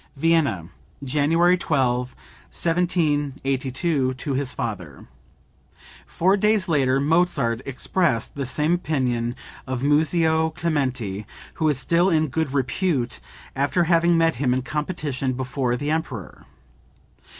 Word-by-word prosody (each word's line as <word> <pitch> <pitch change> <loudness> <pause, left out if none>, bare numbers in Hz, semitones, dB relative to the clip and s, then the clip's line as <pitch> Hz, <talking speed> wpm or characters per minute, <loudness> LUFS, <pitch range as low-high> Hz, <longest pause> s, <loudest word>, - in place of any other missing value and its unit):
(Vienna, 145 - +1 0.4
January 155 +6 +3
12, 125 -5 0 0.3
1782, 145 - 0
to 140 +2 -3
his 135 0 -1
father. 90 - -5 1.0
Four 185 +4 +2
days 210 -1 +2
later 135 -5 +2
Mozart 145 -6 +1
expressed 135 -2 0
the 140 -4 -4
same 150 +5 0
opinion 125 -8 -1 0.3
of 130 0 -3
Muzio 160 +2 +2
Clementi, 130 - -2 0.3
who 155 - +3
is 145 - +1
still 170 +7 +3
in 155 -3 +2
good 155 +1 -1
repute, 135 -1 -1 0.4
after 140 +6 +1
having 170 0 +3
met 165 -4 +2
him 125 -1 +1
in 130 - -2
competition 145 -3 -2
before 130 -1 -2
the 145 +3 -2
emperor. 135 - -4
145 Hz, 115 wpm, -23 LUFS, 130-165 Hz, 1.0 s, January